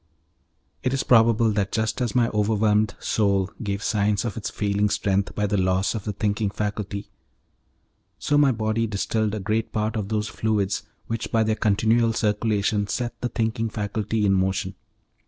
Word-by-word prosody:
It 125 - 0
is 135 - 0
probable 115 -1 +4
that 100 -2 -1
just 110 +3 -1
as 120 0 -1
my 120 -2 +4
overwhelmed 105 0 +1
soul 100 -2 +1
gave 100 -2 -3
signs 105 0 +1
of 115 - -3
its 110 - -4
failing 105 0 0
strength 100 0 0
by 105 - 0
the 105 0 0
loss 95 +1 +1
of 110 -4 -5
the 105 - -1
thinking 105 +1 -1
faculty, 105 0 -4 1.1
so 145 - 0
my 145 -2 +5
body 110 0 0
distilled 110 +1 -1
a - - -3
great 110 +3 -1
part 110 0 -1
of 105 -3 -2
those 105 -1 -1
fluids 105 -2 -1 0.2
which 115 0 -4
by 115 -1 +3
their 110 0 +1
continual 110 +2 +2
circulation 105 -1 0
set 120 +3 -3
the 125 - -1
thinking 115 -1 -1
faculty 105 +1 -2
in 95 - +3
motion. 95 0 0
105 Hz, 170 wpm, -24 LUFS, 100-110 Hz, 1.1 s, my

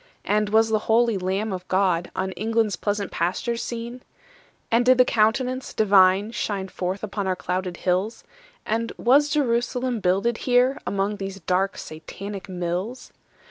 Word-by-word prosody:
And 210 0 +1
was 220 +1 +4
the 220 -1 +2
holy 230 0 +4
Lamb 190 +3 -1
of 185 0 -6
God 185 -2 +1
On 190 0 -2
England's 220 +1 0
pleasant 205 -1 -2
pastures 230 +8 -1
seen? 235 +1 -6 0.7
And 230 +1 +4
did 255 +1 +5
the 250 - +6
Countenance 250 +4 0
Divine 195 0 +4
Shine 195 -4 -3
forth 185 +2 -4
upon 205 -1 -3
our 185 - +1
clouded 180 0 -3
hills? 185 +5 -1 0.4
And 230 +1 -1
was 280 +5 +4
Jerusalem 250 -3 0
builded 195 +5 +1
here 250 +1 +2
Among 200 +1 -1
these 195 0 -6
dark 185 +4 0
Satanic 190 +6 -8
mills? 180 +6 -4
210 Hz, 145 wpm, -24 LUFS, 190-235 Hz, 0.7 s, the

